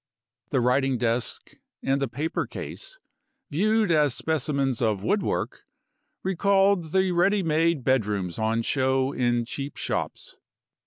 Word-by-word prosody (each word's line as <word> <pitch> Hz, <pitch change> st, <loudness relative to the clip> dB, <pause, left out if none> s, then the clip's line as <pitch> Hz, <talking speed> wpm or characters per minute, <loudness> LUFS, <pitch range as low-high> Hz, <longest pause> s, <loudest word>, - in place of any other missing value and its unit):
The 130 Hz, -, +1 dB
writing 130 Hz, +1 st, +2 dB
desk 120 Hz, 0 st, -1 dB, 0.3 s
and 135 Hz, +1 st, +1 dB
the 135 Hz, -, +1 dB
paper 145 Hz, +7 st, -3 dB
case, -, -, -8 dB, 0.5 s
viewed 215 Hz, +5 st, +2 dB
as 150 Hz, -5 st, +3 dB
specimens 140 Hz, -5 st, -1 dB
of 105 Hz, -4 st, 0 dB
woodwork, 205 Hz, -, -1 dB, 0.6 s
recalled 195 Hz, 0 st, +2 dB
the 190 Hz, +3 st, +1 dB
ready 195 Hz, +3 st, +2 dB
made 165 Hz, -2 st, +1 dB
bedrooms 105 Hz, -9 st, 0 dB
on 110 Hz, +1 st, 0 dB
show 130 Hz, +1 st, +1 dB
in 120 Hz, -3 st, 0 dB
cheap 140 Hz, +4 st, -6 dB
shops. -, -, -4 dB
140 Hz, 120 wpm, -26 LUFS, 120-175 Hz, 0.6 s, as